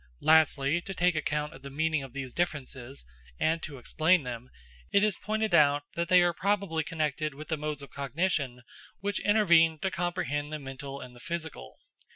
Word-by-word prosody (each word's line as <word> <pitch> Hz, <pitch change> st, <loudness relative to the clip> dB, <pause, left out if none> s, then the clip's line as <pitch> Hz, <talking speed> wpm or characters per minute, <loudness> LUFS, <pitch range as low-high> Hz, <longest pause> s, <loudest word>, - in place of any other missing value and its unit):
Lastly, 155 Hz, 0 st, +4 dB
to 195 Hz, +2 st, -7 dB
take 180 Hz, 0 st, +3 dB
account 150 Hz, -1 st, -2 dB
of -, -, -13 dB
the 140 Hz, -, -8 dB
meaning 155 Hz, +2 st, 0 dB
of 135 Hz, -2 st, -8 dB
these 130 Hz, -1 st, -6 dB
differences, 140 Hz, -, -3 dB, 0.3 s
and 165 Hz, +1 st, +1 dB
to 145 Hz, -4 st, -7 dB
explain 160 Hz, +6 st, +2 dB
them, 125 Hz, 0 st, -6 dB, 0.4 s
it 200 Hz, -, +4 dB
is 210 Hz, -4 st, +1 dB
pointed 215 Hz, -1 st, -1 dB
out 145 Hz, -2 st, +5 dB
that 170 Hz, 0 st, -1 dB
they 180 Hz, 0 st, +6 dB
are 175 Hz, 0 st, +2 dB
probably 195 Hz, -3 st, 0 dB
connected 155 Hz, -1 st, -2 dB
with 155 Hz, +2 st, -10 dB
the 160 Hz, -, +1 dB
modes 150 Hz, -1 st, -4 dB
of 140 Hz, -, -11 dB
cognition 140 Hz, -3 st, -1 dB, 0.4 s
which 205 Hz, +1 st, -1 dB
intervene 170 Hz, -7 st, +4 dB
to 190 Hz, +5 st, -2 dB
comprehend 170 Hz, -5 st, -2 dB
the 155 Hz, -, -2 dB
mental 135 Hz, 0 st, -7 dB
and 125 Hz, -1 st, -10 dB
the -, -, -14 dB
physical. 160 Hz, -, -6 dB
155 Hz, 185 wpm, -29 LUFS, 140-175 Hz, 0.4 s, they